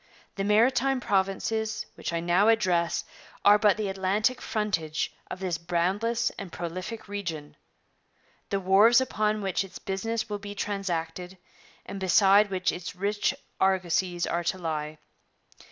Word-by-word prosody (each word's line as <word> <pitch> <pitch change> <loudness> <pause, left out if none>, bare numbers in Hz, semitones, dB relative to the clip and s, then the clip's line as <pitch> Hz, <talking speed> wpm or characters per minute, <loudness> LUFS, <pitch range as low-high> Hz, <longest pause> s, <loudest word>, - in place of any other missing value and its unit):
The 195 - -3
Maritime 245 +6 +3
Provinces 215 +1 -1
which - - -5
I 170 0 -1
now 175 +5 +3
address 185 -7 +2 0.4
are 205 +1 +7
but 210 -1 +4
the 215 -2 -2
Atlantic 195 +6 0
frontage 200 -8 -2 0.2
of - - -6
this 180 -4 -2
boundless 195 +8 0
and 195 -3 -7
prolific 185 +8 -6
region 175 -8 -5 0.9
the 195 - 0
wharves 200 +6 +6
upon 215 -5 0
which 190 0 0
its 195 - -10
business 225 +5 -3
will 205 -1 -4
be 205 0 -8
transacted 180 -3 -3 0.5
and 200 - -6
beside 195 +2 +5
which 185 -1 0
its 180 0 -7
rich 205 +2 0 0.2
argosies 185 -2 +1
are 170 0 -1
to 190 - 0
lie. 155 -3 -4
195 Hz, 135 wpm, -27 LUFS, 175-215 Hz, 0.9 s, are